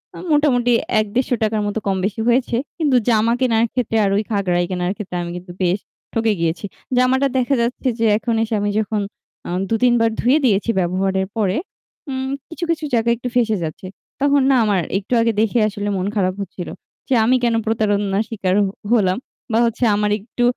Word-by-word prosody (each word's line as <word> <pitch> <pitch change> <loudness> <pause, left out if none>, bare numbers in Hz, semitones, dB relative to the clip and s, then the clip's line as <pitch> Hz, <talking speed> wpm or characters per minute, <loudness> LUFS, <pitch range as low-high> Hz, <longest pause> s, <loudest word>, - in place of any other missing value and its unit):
আ - - -9
মোটামুটি 255 -5 +3 0.3
৳১-৳১৫০ 220 -1 0
মতো 205 +2 -2
কম-বেশি 195 +3 -1
হয়েছে। 240 0 +2 0.2
কিন্তু 295 -6 +2
জামা 225 +1 +3
কেনার 230 -3 +3
ক্ষেত্রে 235 -3 0
আর 195 - +2
ওই 215 - +1
খাগড়াই 180 -4 +1
কেনার 180 0 -1
ক্ষেত্রে 195 -5 -6
আমি 170 - -5
কিন্তু 180 0 -10
বেশ 180 +3 +1 0.3
ঠকে 225 -1 +2
গিয়েছি। 165 +4 -1 0.3
জামাটা 260 +2 +3
দেখা 255 +2 +2
যাচ্ছে 245 +2 -2
যে 230 - +2
এখন 230 0 -1
এসে 225 - -3
আমি 205 - 0
যখন 215 -1 -1 0.5
আ - - -5 0.2
২-৩ 240 +2 +3
বার 230 0 +2
ধুয়ে 255 +6 +4
দিয়েছি 205 -1 +2
ব্যবহারের 190 +2 0
পরে 200 -2 +1 0.5
উম 265 0 -3 0.2
কিছু, 335 +1 -7
কিছু 315 -2 0
জায়গায় 235 0 +3
একটু 245 +1 -4
ফেঁসে 225 -4 +2
যাচ্ছে। 160 +4 -6 0.3
তখন 285 0 +4
না 270 - +5
আমার 200 -4 +2 0.2
একটু 205 +5 -4
আগে 230 0 +2
দেখে 225 +2 +2
আসলে 205 0 -3
মন 185 +1 -1
খারাপ 185 -2 +1
হচ্ছিল। 185 -2 -6 0.4
যে - - +2
আমি 255 +3 +4
কেন 235 -1 +2
প্রতারণা 205 -3 +1
স্বীকার 190 -5 -1
হ - - -1 0.2
হলাম 190 -5 +3 0.3
বা 225 - +3
হচ্ছে 235 +2 -2
আমার 210 0 0
একটু 235 +4 -4
220 Hz, 185 wpm, -20 LUFS, 195-245 Hz, 0.5 s, না